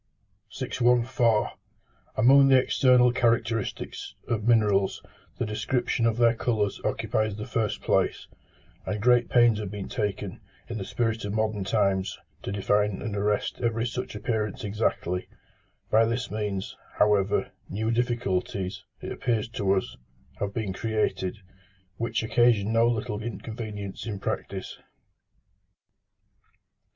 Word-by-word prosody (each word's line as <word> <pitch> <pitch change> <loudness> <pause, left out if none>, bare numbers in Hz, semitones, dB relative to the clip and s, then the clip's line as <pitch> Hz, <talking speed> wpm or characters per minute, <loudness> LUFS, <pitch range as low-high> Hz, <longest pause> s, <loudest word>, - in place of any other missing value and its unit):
614. 120 -2 +2 0.7
Among 135 +4 +7
the 135 -1 +7
external 125 -1 +4
characteristics 115 -3 -1
of 110 -2 -1
minerals, 105 -4 +3 0.4
the - - -1
description 115 +2 0
of 115 -1 0
their 120 -1 +5
colours 110 -4 -1
occupies 110 -2 0
the 105 0 -5
first 110 -3 -2
place; - - +1 0.6
and 105 - -1
great 120 +2 +4
pains 120 -3 +5
have 105 -3 -4
been 100 -1 -6
taken, 105 -3 -3 0.3
in 115 -2 -4
the 95 - -4
spirit 115 0 -1
of 100 +1 -3
modern 110 -2 0
times, 95 -1 +1 0.2
to - - -5
define 105 0 +1
and 110 -2 -4
arrest 105 0 -1
every 115 -1 0
such 125 -2 -4
appearance 105 -1 -2
exactly: 100 -4 -1 0.6
by 110 +1 +6
this 115 0 -2
means, 105 -3 -3 0.2
however, 105 -1 +2 0.2
new 110 +4 -1
difficulties, 100 -5 -1 0.2
it - - -5
appears 115 -5 -1
to 100 -4 0
us, 95 -10 -2 0.4
have 100 -1 -1
been 105 -3 -3
created, 105 -2 -1 0.6
which 115 -1 -1
occasion 110 -2 +3
no 115 +1 +4
little 110 -2 -1
inconvenience 110 -2 -6
in 105 -3 -3
practice. - - -4
110 Hz, 125 wpm, -27 LUFS, 100-115 Hz, 0.7 s, Among